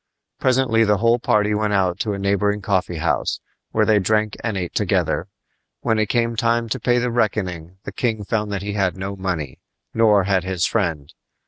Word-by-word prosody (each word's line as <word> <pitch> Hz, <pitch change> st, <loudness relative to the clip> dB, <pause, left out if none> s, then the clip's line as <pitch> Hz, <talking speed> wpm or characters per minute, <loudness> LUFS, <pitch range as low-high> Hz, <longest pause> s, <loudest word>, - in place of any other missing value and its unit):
Presently 125 Hz, -3 st, +3 dB
the 105 Hz, -1 st, +3 dB
whole 115 Hz, +3 st, +3 dB
party 105 Hz, -2 st, +2 dB
went 105 Hz, 0 st, 0 dB
out 95 Hz, -2 st, +1 dB
to 105 Hz, -3 st, -1 dB
a -, -, -3 dB
neighboring 100 Hz, +1 st, +1 dB
coffee 95 Hz, -3 st, 0 dB
house, 80 Hz, -, -1 dB, 0.3 s
where -, -, +2 dB
they 110 Hz, -1 st, +4 dB
drank 105 Hz, +2 st, +1 dB
and 110 Hz, -4 st, -1 dB
ate 90 Hz, -2 st, -4 dB
together. -, -, 0 dB, 0.5 s
When 110 Hz, -2 st, +1 dB
it 110 Hz, -1 st, 0 dB
came 115 Hz, -1 st, +1 dB
time 115 Hz, +1 st, +1 dB
to 130 Hz, -, -2 dB
pay 120 Hz, +2 st, +2 dB
the 125 Hz, 0 st, 0 dB
reckoning 95 Hz, -7 st, -2 dB
the -, -, -6 dB
king 110 Hz, -4 st, -1 dB
found 105 Hz, 0 st, -2 dB
that 100 Hz, -1 st, -3 dB
he 100 Hz, 0 st, -3 dB
had 95 Hz, -3 st, 0 dB
no 95 Hz, +1 st, -4 dB
money, 90 Hz, -8 st, -4 dB, 0.3 s
nor 105 Hz, -3 st, +4 dB
had 95 Hz, -2 st, +1 dB
his 95 Hz, -2 st, -1 dB
friend. 80 Hz, -10 st, -1 dB
105 Hz, 195 wpm, -21 LUFS, 95-115 Hz, 0.5 s, they